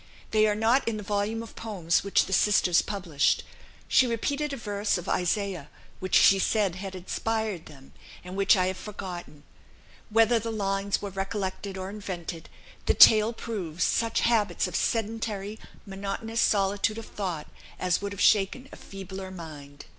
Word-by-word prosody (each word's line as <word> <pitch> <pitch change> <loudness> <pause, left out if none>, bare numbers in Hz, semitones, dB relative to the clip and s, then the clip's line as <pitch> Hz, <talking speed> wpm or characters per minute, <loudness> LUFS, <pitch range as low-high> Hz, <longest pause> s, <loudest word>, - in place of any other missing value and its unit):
They 215 0 +4
are 210 - +1
not 230 +5 +2
in 225 -2 0
the 210 - -6
volume 205 +3 -1
of 230 - -12
poems 185 -7 -1
which 200 - +2
the 190 - -4
sisters 185 -3 +4
published. 180 -9 0 0.4
She 260 - +4
repeated 280 +6 -1
a 275 - -4
verse 205 -3 -1
of 180 - -7
Isaiah, 180 -4 -1 0.3
which 185 0 -1
she 195 - +7
said 200 -2 +1
had 190 +1 -7
inspired 215 0 -3
them, 135 -2 -15 0.3
and 180 +1 -8
which 195 +1 +4
I 185 - +2
have 185 0 -2
forgotten. 180 -7 -8 0.7
Whether 225 +2 +4
the 230 +1 -4
lines 195 -2 -1
were 200 - -4
recollected 195 0 -4
or 190 +1 -5
invented, 180 -5 -6 0.4
the - - +3
tale 215 +1 +8
proves 195 -8 -4
such 230 -1 +1
habits 230 -3 +2
of 180 - -6
sedentary, 220 -2 -2 0.3
monotonous 200 +3 -3
solitude 205 +2 +2
of 225 - -6
thought 180 -7 -4 0.3
as 180 0 +1
would 200 0 -4
have 200 - -8
shaken 215 +6 +3
a - - -11
feebler 190 -1 -8
mind." 150 -6 -10
200 Hz, 160 wpm, -27 LUFS, 185-220 Hz, 0.7 s, tale